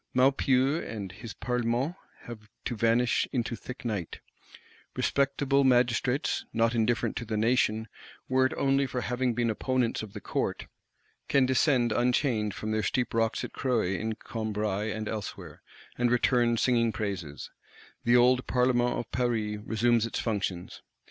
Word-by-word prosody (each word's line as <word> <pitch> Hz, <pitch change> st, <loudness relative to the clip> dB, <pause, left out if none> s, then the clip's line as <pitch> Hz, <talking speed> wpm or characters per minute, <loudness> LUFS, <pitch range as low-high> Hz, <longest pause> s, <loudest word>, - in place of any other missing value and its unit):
Maupeou 135 Hz, +2 st, +3 dB
and 100 Hz, -4 st, -6 dB
his 105 Hz, +3 st, -9 dB
Parlement 125 Hz, -, -1 dB, 0.3 s
have 110 Hz, -3 st, -10 dB, 0.2 s
to 120 Hz, -, -2 dB
vanish 115 Hz, +2 st, +2 dB
into 120 Hz, -2 st, -1 dB
thick 125 Hz, +4 st, -9 dB
night; 100 Hz, -8 st, -3 dB, 0.8 s
respectable 140 Hz, 0 st, +1 dB
Magistrates, 125 Hz, +2 st, +2 dB
not 115 Hz, +1 st, +2 dB
indifferent 115 Hz, +1 st, +1 dB
to -, -, -3 dB
the 110 Hz, -1 st, -3 dB
Nation, 110 Hz, -1 st, +1 dB, 0.4 s
were 130 Hz, 0 st, +3 dB
it -, -, -7 dB
only 135 Hz, 0 st, +2 dB
for 125 Hz, -1 st, -3 dB
having 125 Hz, -1 st, -1 dB
been 120 Hz, -1 st, +1 dB
opponents 125 Hz, +1 st, 0 dB
of 105 Hz, -2 st, -9 dB
the 105 Hz, -, -6 dB
Court, -, -, -2 dB, 0.6 s
can 135 Hz, -2 st, +4 dB
descend 130 Hz, -2 st, +2 dB
unchained 120 Hz, -3 st, +1 dB
from 110 Hz, -, -4 dB
their 110 Hz, 0 st, +1 dB
"steep 125 Hz, +5 st, -1 dB
rocks 115 Hz, -1 st, 0 dB
at -, -, -6 dB
Croe 125 Hz, -4 st, 0 dB
in 105 Hz, +4 st, -2 dB
Combrailles" 105 Hz, -2 st, -3 dB
and 110 Hz, 0 st, -4 dB
elsewhere, 105 Hz, -2 st, -6 dB, 0.4 s
and 120 Hz, 0 st, +3 dB
return 120 Hz, -1 st, +2 dB
singing 115 Hz, -1 st, +2 dB
praises: 95 Hz, -10 st, -5 dB, 0.5 s
the 120 Hz, +1 st, +4 dB
old 125 Hz, +1 st, +4 dB
Parlement 125 Hz, -1 st, +2 dB
of 115 Hz, -, -5 dB
Paris 110 Hz, -4 st, -1 dB
resumes 115 Hz, +1 st, +2 dB
its -, -, -4 dB
functions. 95 Hz, -5 st, -3 dB
120 Hz, 150 wpm, -28 LUFS, 110-125 Hz, 0.8 s, can